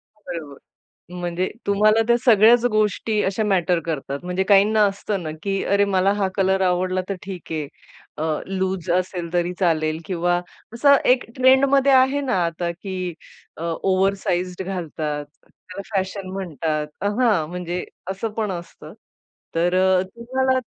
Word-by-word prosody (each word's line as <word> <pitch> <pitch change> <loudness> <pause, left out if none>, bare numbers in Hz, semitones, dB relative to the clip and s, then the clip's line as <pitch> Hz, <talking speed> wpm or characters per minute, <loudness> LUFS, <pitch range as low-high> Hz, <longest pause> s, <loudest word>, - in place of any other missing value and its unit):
बरोबर. 165 -9 -8 0.6
म्हणजे 175 +1 -2 0.2
तुम्हाला 215 +2 +4
त्या 235 - +5
सगळ्याच 230 +1 +6
गोष्टी 215 0 +1
अशा 195 +3 0
मॅटर 180 -4 +2
करतात. 140 -3 -3
म्हणजे 180 +1 -1
काहींना 205 +2 +4
असतं 200 0 -2
ना, 155 - -4
की 195 -1 -1
अरे 200 0 +2
मला 195 0 +2
हा 205 -2 0
कलर 190 -1 +2
आवडला 185 0 +1
तर 195 - -1
ठीक 190 -4 -8
आहे, 155 -2 -2 0.5
अ, 155 - -3 0.2
लूज 190 -2 -2
असेल 180 -1 -1
तरी 175 0 0
चालेल 155 -3 +1
किंवा 175 -1 0 0.3
असं 280 +4 +5 0.2
एक 255 - -3
ट्रेंडमध्ये 270 +1 +4
आहे 265 +2 +4
ना 260 -7 -1
आता, 170 +1 -2
की 185 0 -5 0.4
अ, 160 - -6
ओव्हरसाइज्ड 185 +1 0
घालतात, 155 -5 -4 0.2
त्याला 185 +2 -11
फॅशन 190 0 -2
म्हणतात. 160 -5 -2
अ 200 - 0
हां, 205 -11 +2
म्हणजे 180 0 -4 0.3
असं 195 +4 -3
पण 215 -3 -1
असतं. 175 -1 -9 0.6
तर 175 +2 +1
अ, 185 0 +4
तुम्हाला 260 +2 0
190 Hz, 145 wpm, -22 LUFS, 175-210 Hz, 0.6 s, सगळ्याच